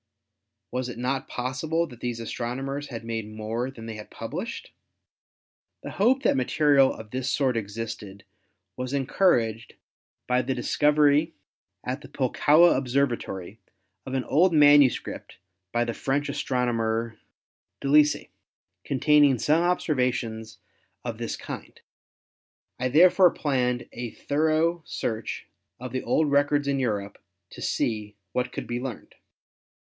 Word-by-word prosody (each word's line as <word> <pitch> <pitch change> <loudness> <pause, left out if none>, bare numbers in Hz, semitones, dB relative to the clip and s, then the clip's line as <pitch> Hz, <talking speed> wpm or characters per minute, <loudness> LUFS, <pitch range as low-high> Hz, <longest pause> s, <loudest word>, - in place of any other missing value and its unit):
Was 125 0 -2
it 120 - -7
not 130 +2 -2
possible 140 +7 -1
that 125 -7 -13
these 120 -2 -3
astronomers 135 +5 -4
had 115 -3 -7
made 115 -2 -4
more 110 +3 -3
than 115 -4 -10
they 115 - -5
had 105 - -10
published? - - -6 1.1
The - - -6
hope 250 +7 +2
that - - +3
material 135 +1 +4
of 110 -1 -10
this 130 0 -2
sort 130 -3 +1
existed 105 -2 -5 0.5
was 130 +1 -4
encouraged 125 - +1 0.5
by 125 0 +2
the 130 +1 -2
discovery 150 +4 +3 0.5
at 130 +3 -4
the - - -11
Pul 130 -3 -2
kowa 165 +4 +5
Observatory 120 -7 -2 0.5
of 130 - -3
an 130 - 0
old\ 170 +7 +3
manuscript 145 -3 +4 0.3
by 120 0 +1
the 115 - -3
French 140 +4 -1
astronomer 115 -5 -1 0.6
Delisle, 150 +2 +3 0.6
containing 145 0 +4
some 155 +8 +2
observations 125 -10 -1 0.5
of - - -4
this - - -3
kind. - - -8 1.0
I 125 - 0
therefore 175 +6 +6
planned 125 -6 -1
a 120 -1 -5
thoro 160 +6 0
search 110 -6 -4 0.3
of 125 +1 -7
the 130 - -2
old 155 -2 +1
rec 145 +1 +3
ords 145 -1 +1
in 140 -1 +1
Europe 105 -6 -2 0.3
to - - -10
see 105 -2 -2 0.2
what 125 0 -1
could - - -5
be 120 0 -3
learned." 125 -4 -7
130 Hz, 135 wpm, -26 LUFS, 115-145 Hz, 1.1 s, therefore